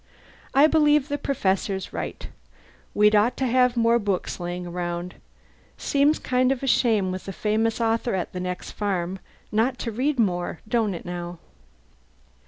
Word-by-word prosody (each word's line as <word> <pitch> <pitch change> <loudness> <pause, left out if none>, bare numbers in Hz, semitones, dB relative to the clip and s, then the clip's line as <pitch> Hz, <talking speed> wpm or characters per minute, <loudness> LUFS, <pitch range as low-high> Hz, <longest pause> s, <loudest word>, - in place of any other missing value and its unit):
I 280 +2 +7
believe 300 -2 +3
the 290 0 -2
Professor's 195 -7 -1
right: - - -5 0.7
we'd 210 +1 +5
ought 215 +4 +3
to 265 - 0
have 250 0 +3
more 230 0 +4
books 200 -4 -2
laying 175 0 -4
around. 175 0 -4 0.6
Seems 285 +2 +2
kind 255 0 +1
of 270 -1 -2
a - - 0
shame, 220 -7 +2
with 185 +1 -6
a - - -3
famous 220 +4 0
author 230 -1 0
at 180 - -3
the 180 - -4
next 180 0 -4
farm, 190 -2 -2 0.3
not 235 +4 +1
to 230 - -4
read 265 +6 0
more, 180 -6 0
don't 220 -4 +1
it, - - -8
now?" 175 0 -5
215 Hz, 160 wpm, -24 LUFS, 185-250 Hz, 0.7 s, I